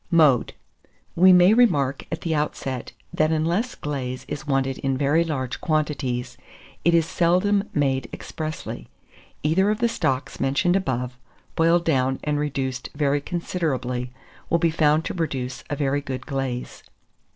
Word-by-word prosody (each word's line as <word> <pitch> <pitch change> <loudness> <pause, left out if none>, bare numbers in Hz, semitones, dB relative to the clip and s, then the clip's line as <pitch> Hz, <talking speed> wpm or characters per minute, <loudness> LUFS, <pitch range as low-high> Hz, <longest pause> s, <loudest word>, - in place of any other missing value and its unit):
Mode. 155 -8 +4 0.6
We 185 +2 +7
may 180 +2 +7
remark 150 - +2
at 165 - -3
the 165 - -1
outset, 135 -4 -2 0.2
that 155 +1 +2
unless 170 +10 0
glaze 130 -4 -4
is 145 - -6
wanted 135 -1 0
in 135 -1 -1
very 145 +4 +3
large 135 -6 -3
quantities, 130 -6 -1 0.5
it 170 0 +4
is 165 -2 +4
seldom 185 +4 +2
made 135 -3 0
expressly. 155 -1 -6 0.5
Either 180 +7 +3
of 210 - +1
the 235 - +2
stocks 135 - -2
mentioned 140 +7 +2
above, 125 -9 -2 0.4
boiled 170 +1 +3
down 130 -4 +1
and 150 -1 0
reduced 135 -3 -3
very 145 -1 +1
considerably, 130 -8 -2 0.4
will 170 - +3
be 165 -1 +2
found 155 0 +2
to - - -3
produce 135 -7 -3
a 145 - -1
very 145 0 0
good 135 -2 -5
glaze. 135 -3 -4
150 Hz, 145 wpm, -24 LUFS, 135-170 Hz, 0.6 s, We